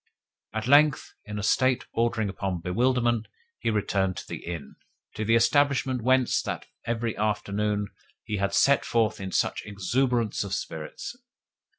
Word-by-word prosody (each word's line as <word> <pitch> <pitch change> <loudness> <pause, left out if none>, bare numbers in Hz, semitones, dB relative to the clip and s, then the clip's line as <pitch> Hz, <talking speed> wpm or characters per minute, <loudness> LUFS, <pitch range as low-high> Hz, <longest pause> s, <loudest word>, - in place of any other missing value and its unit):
At 110 0 -3
length, 145 +2 +4
in 105 0 -6
a 105 - -3
state 130 +5 +2
bordering 115 -2 +1
upon 95 -3 -3
bewilderment, 120 +4 +1 0.3
he - - 0
returned 100 -3 0
to - - -7
the - - -7
inn 80 -5 -7 0.4
to 110 - -3
the 115 +2 +3
establishment 130 +1 +3
whence, 130 +1 +3
that - - -4 0.2
every 115 -1 -1
afternoon, 105 -1 -1 0.3
he 105 - -3
had 100 0 0
set 140 +1 +4
forth 110 -3 +1
in 95 -1 -5
such - - 0
exuberance 115 +4 0
of 100 -1 -2
spirits. 90 - -6
110 Hz, 150 wpm, -27 LUFS, 100-125 Hz, 0.4 s, length